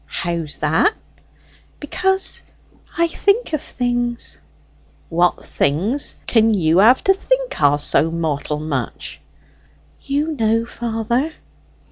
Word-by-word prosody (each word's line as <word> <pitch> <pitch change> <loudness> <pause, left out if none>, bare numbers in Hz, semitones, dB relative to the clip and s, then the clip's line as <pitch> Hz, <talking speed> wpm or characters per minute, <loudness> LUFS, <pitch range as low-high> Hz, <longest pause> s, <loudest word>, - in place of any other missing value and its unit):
"How's 170 -3 -3
that?" 160 - +2 0.8
"Because 380 +5 0 0.6
I 335 0 +3
think 400 +4 +1
of 310 - 0
things." 245 -1 -2 0.7
"What 175 +1 +1
things 195 - 0
can 225 -1 +3
you 165 -2 +3
have 235 +6 +6
to 385 - +5
think - - -1
o' 145 0 +5
so 145 +1 +2
mortal 155 -3 -2
much?" 140 -6 -4 0.8
"You 290 +3 -1
know, 225 -1 +1
father." 235 +6 -2
225 Hz, 105 wpm, -20 LUFS, -, 0.8 s, have